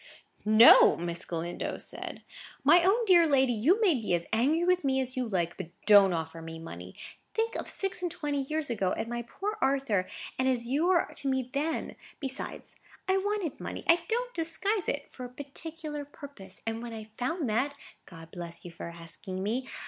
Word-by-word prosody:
"No," 215 +3 +8
Miss 170 0 -3
Galindo 170 +1 -4
said; - - -4 0.4
"my 345 0 +6
own 430 +6 +3
dear 350 -4 +6
lady, 265 -4 +3
you 290 - +3
may 390 -6 +5
be 220 -9 0
as 170 - -3
angry 285 +9 +3
with 360 -1 +2
me 265 -1 +2
as 260 -1 -3
you 255 -2 -1
like, 175 -4 -1
but 185 -4 -6 0.2
don't 200 -2 +7
offer 165 -1 -4
me 165 0 -7
money. 90 - -9 0.4
Think 455 +1 0
of - - -4
six 390 -1 -2
and 355 - -1
twenty 295 -5 -2
years 300 0 -2
ago, 195 -5 0
and 235 +1 -4
poor 420 - -4
Arthur, 265 -9 +1 0.3
and 260 - +2
as 245 -2 +1
you 285 +8 +1
were 365 -2 +4
to 275 - -4
me 260 -2 0
then! 305 +3 -2 0.2
Besides, 270 -2 -5 0.3
I 380 0 +3
wanted 400 -5 -2
money—I 340 +1 +1
don't - - -1
disguise 365 +4 -1
it—for 280 -2 -4
a - - -8
particular 295 +3 -7
purpose; 275 -10 -9
and 225 0 -2
when 235 -1 -6
I 220 -1 -6 0.2
found 280 +4 -1
that 260 +7 0 0.3
(God 165 -2 -12
bless 170 -1 -8
you 175 - -7
for 170 - -8
asking 170 +3 -6
me!) 245 +6 -2
265 Hz, 185 wpm, -29 LUFS, 195-330 Hz, 0.4 s, No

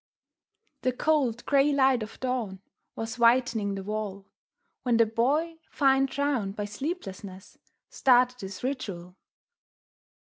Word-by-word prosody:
The 255 - 0
cold, 255 -5 0
grey 280 +1 +3
light 265 -3 +3
of 215 - -8
dawn 235 -7 -3 0.3
was 225 +2 -5
whitening 230 -4 +3
the 195 - -5
wall 205 -1 -4 0.6
When 240 -2 +2
the 230 - +5
Boy, 290 +9 0
fine 270 -1 +3
drawn 265 -7 -1
by 205 0 -4
sleeplessness, 205 - -7 0.3
started 250 -1 +3
his 195 +3 -8
ritual. 195 -10 -4
240 Hz, 115 wpm, -27 LUFS, 205-270 Hz, 0.6 s, the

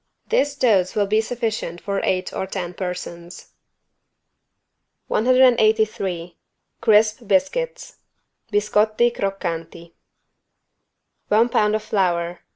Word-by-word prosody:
This 290 - +1
dose 205 -9 +2
will 205 -1 +2
be 215 +2 +2
sufficient 220 -7 -3
for 200 +1 -3
eight 185 0 -1
or 190 - -3
ten 180 -2 -5
persons. 180 -1 -7 1.6
183 220 -7 +2 0.4
CRISP 215 +1 +3
BISCUITS 485 - -1 0.5
(Biscotti 215 +3 +2
croccanti) 170 -4 -4 1.4
One 225 +3 +3
pound 210 -2 +2
of 215 - -3
flour. 175 -4 -1
210 Hz, 90 wpm, -21 LUFS, 180-225 Hz, 1.6 s, CRISP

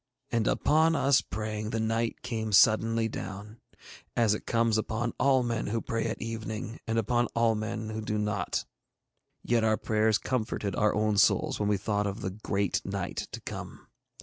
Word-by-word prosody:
And 115 -2 +1
upon 160 +3 +3
us 140 -3 +4
praying 110 0 -4
the 115 - -2
night 115 +1 -1
came 110 -3 -3
suddenly 115 +3 +5
down, 105 +1 -7 0.6
as 115 -3 +3
it 105 - -5
comes 115 -1 +2
upon 115 +2 -2
all 130 -1 +4
men 115 -2 -2
who 115 +3 0
pray 115 0 -2
at 110 - -4
evening 110 0 -5
and 115 0 0
upon 120 +2 +2
all 115 -1 +3
men 110 0 -3
who 110 0 -4
do 105 0 -2
not; 105 -1 -1 0.8
yet 115 -2 +2
our 110 -1 +3
prayers 110 0 +2
comforted 110 -6 -2
our 105 0 +2
own 105 -1 +2
souls - - +3
when 105 -1 +1
we 105 - +2
thought 105 +1 -1
of 100 +3 -4
the 95 - -2
Great 100 -1 -1
Night - - -4
to - - -6
come. - - -8
110 Hz, 175 wpm, -29 LUFS, 105-115 Hz, 0.8 s, suddenly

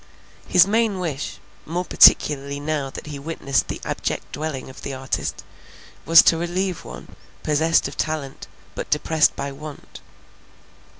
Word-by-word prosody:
His 180 -1 +6
main 220 0 +1
wish, 155 -6 -4 0.3
more 175 +3 -3
particularly 140 -3 +5
now 145 -2 -2
that - - -9
he 145 -2 -7
witnessed 140 -2 -1
the - - -5
abject - - -3
dwelling 145 -2 -5
of 130 - -12
the 135 - -5
artist, 130 0 -4 0.6
was 165 0 +9
to 165 - +4
relieve 175 +2 -2
one, - - -11 0.3
possessed 160 +2 +2
of - - -10
talent, 155 -4 -4 0.3
but - - -6
depressed 150 +1 +2
by 140 0 -4
want. 150 +1 -11
155 Hz, 140 wpm, -22 LUFS, 140-165 Hz, 0.6 s, was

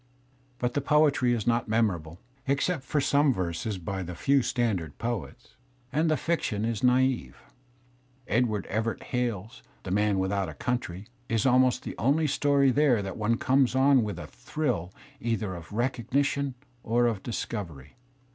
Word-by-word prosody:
But 125 0 -1
the 145 - 0
poetry 145 -3 +3
is 115 -4 0
not 120 0 +1
memorable, 95 -8 0 0.3
except 145 +4 +1
for 145 +3 0
some 145 +1 +3
verses 95 +1 -2
by 95 +2 -4
the 90 -1 -6
few 140 +9 +3
standard 105 - -1
poets. 120 +1 -5 0.4
And 155 +3 +2
the 155 - +2
fiction 110 -11 -1
is 115 -3 -2
naive. 125 - +2 0.9
Edward 110 -3 +1
Everett 110 +2 -2
Hale's 120 -3 -3 0.2
"The 95 - -5
Man 105 0 +2
With 95 0 0
out 100 -4 -1
a 75 - -9
Country" 110 - -3 0.2
is 115 -2 +1
almost 130 -1 +4
the - - -6
only 145 +8 +2
story 140 -1 +3
there 130 -6 +3
that 95 -1 -5
one 115 +2 +1
comes 130 0 +2
on 135 0 +5
with 105 -2 -3
a - - -6
thrill 125 - -3 0.3
either 115 -6 -2
of 85 +1 -9
recognition 130 +4 0 0.3
or 120 +1 +2
of 110 -5 0
discovery. 90 - -5
120 Hz, 155 wpm, -28 LUFS, 100-135 Hz, 0.9 s, on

